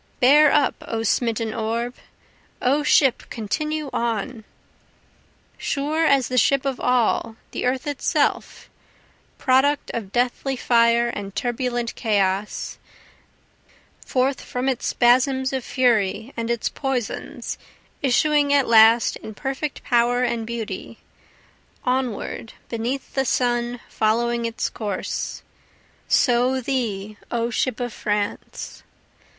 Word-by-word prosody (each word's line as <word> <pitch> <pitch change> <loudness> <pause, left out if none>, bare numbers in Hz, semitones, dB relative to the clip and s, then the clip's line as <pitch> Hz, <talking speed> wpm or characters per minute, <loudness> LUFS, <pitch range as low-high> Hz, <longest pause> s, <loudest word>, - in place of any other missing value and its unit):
Bear 290 +4 +6
up 275 - +3
O 225 -1 -2
smitten 225 0 0
orb! 230 +2 -2 0.7
O 275 +4 +2
ship 275 -3 +4
continue 305 +8 -3
on! 230 0 -2 1.1
Sure 310 +3 0
as 275 -3 +3
the 255 0 +2
ship 275 +3 +2
of 270 -2 -1
all, 235 -2 +1 0.2
the - - -3
Earth 260 +2 -1
itself, 290 -2 -1 0.7
Product 275 +2 +2
of 210 -5 -4
deathly 250 +3 0
fire 235 -1 +3
and 200 -4 -6
turbulent 240 -1 -2
chaos, 200 -2 -1 1.2
Forth 260 +1 0
from 250 +1 -3
its 260 -3 -1
spasms 260 +2 +3
of 260 -2 -2
fury 230 -1 +1
and 230 0 -3
its 235 -2 0
poisons, 265 -5 -4 0.4
Issuing 290 +2 +3
at 280 -2 +4
last 225 +1 +6
in 220 - -10
perfect 275 +3 -4
power 245 +1 +2
and 235 -2 -1
beauty, 225 -2 -5 0.9
Onward 250 -3 -2 0.2
beneath 240 +4 -3
the 270 - +1
sun 240 -1 0
following 235 +2 0
its 230 0 -2
course, 205 -4 -4 0.6
So 250 +2 +3
thee 215 -6 -3
O 235 0 -1
ship 245 0 -1
of 245 -2 -3
France! 205 -1 -3
245 Hz, 110 wpm, -23 LUFS, 230-265 Hz, 1.2 s, Bear